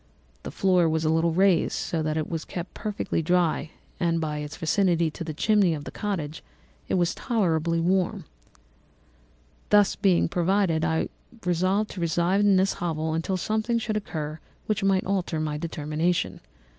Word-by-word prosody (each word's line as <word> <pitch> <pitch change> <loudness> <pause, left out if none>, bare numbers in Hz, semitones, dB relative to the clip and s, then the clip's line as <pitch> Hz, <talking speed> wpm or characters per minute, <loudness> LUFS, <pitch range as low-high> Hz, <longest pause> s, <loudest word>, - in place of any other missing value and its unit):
The - - -6
floor 180 -3 +2
was 160 0 0
a 155 - +3
little 165 +1 +2
raised, 185 0 +3
so 165 - -2
that 155 0 -1
it 155 - -1
was 165 -2 -3
kept 175 0 -6
perfectly 210 -5 -2
dry, 170 -1 +1 0.3
and 165 -1 +1
by 150 -2 -2
its 150 0 -6
vicinity 170 -1 +2
to 170 - -6
the 160 - -4
chimney 195 +1 +2
of 145 - -7
the - - -7
cottage 165 -8 -4 0.4
it - - 0
was 175 -1 +2
tolerably 170 -8 0
warm. 180 +2 0 1.4
"Being 200 -3 +4
thus - - -4
provided, 175 -2 +1
I 160 -1 0 0.4
resolved 185 +4 +1
to 185 - -6
reside 170 +3 +1
in 205 -1 +4
this 190 +1 +3
hovel 160 -2 -1
until 165 +4 -1
something 220 +5 0
should 220 -1 -2
occur 155 -7 -4 0.3
which 215 -1 -1
might 195 -1 +2
alter 185 -4 -1
my 150 -1 -2
determination. 160 +2 -1
170 Hz, 165 wpm, -26 LUFS, 160-195 Hz, 1.4 s, Being